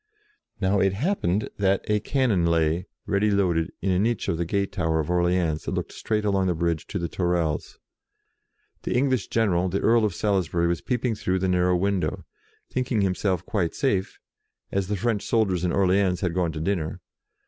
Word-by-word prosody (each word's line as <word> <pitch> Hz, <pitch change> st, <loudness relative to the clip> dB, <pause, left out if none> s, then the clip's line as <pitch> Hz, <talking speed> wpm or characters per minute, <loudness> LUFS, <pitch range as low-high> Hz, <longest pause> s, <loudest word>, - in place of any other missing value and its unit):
Now 100 Hz, 0 st, +2 dB
it 95 Hz, 0 st, +2 dB
happened 105 Hz, -, 0 dB
that 100 Hz, -1 st, +2 dB
a 105 Hz, 0 st, +2 dB
cannon 110 Hz, -8 st, +1 dB
lay, 85 Hz, +2 st, +1 dB, 0.2 s
ready 105 Hz, +1 st, +1 dB
loaded, 90 Hz, -5 st, +1 dB
in 95 Hz, -, +1 dB
a 90 Hz, -, +2 dB
niche 115 Hz, +2 st, 0 dB
of 80 Hz, -, -1 dB
the 85 Hz, -, 0 dB
gate 100 Hz, +3 st, -1 dB
tower 80 Hz, -4 st, 0 dB
of 80 Hz, +2 st, -2 dB
Orleans 90 Hz, -3 st, +1 dB
that -, -, -3 dB
looked -, -, -3 dB
straight 105 Hz, -1 st, -2 dB
along 95 Hz, -2 st, +2 dB
the 90 Hz, -, +1 dB
bridge 85 Hz, -1 st, -1 dB
to -, -, -4 dB
the 85 Hz, -2 st, -2 dB
Tourelles. 85 Hz, -4 st, -1 dB, 1.0 s
The -, -, -2 dB
English 130 Hz, -3 st, +1 dB
general, 95 Hz, -5 st, +1 dB
the 95 Hz, +3 st, -1 dB
Earl 115 Hz, 0 st, +3 dB
of 105 Hz, -5 st, 0 dB
Salisbury, 90 Hz, -4 st, 0 dB
was 85 Hz, 0 st, 0 dB
peeping 125 Hz, -1 st, -1 dB
through 95 Hz, -3 st, -1 dB
the 95 Hz, 0 st, 0 dB
narrow 90 Hz, 0 st, +2 dB
window, 95 Hz, +1 st, -1 dB, 0.5 s
think 130 Hz, -1 st, -2 dB
ing 110 Hz, -4 st, +2 dB
himself 95 Hz, -1 st, 0 dB
quite 90 Hz, -7 st, -1 dB
safe, 100 Hz, -9 st, 0 dB, 0.5 s
as 100 Hz, -1 st, -1 dB
the 105 Hz, 0 st, -1 dB
French 110 Hz, 0 st, 0 dB
soldiers 100 Hz, -6 st, +1 dB
in 90 Hz, -, +1 dB
Orleans 95 Hz, -1 st, +2 dB
had 90 Hz, -3 st, 0 dB
gone 90 Hz, -2 st, 0 dB
to 80 Hz, -, -5 dB
dinner. 80 Hz, -2 st, -2 dB
95 Hz, 190 wpm, -25 LUFS, 85-105 Hz, 1.0 s, Earl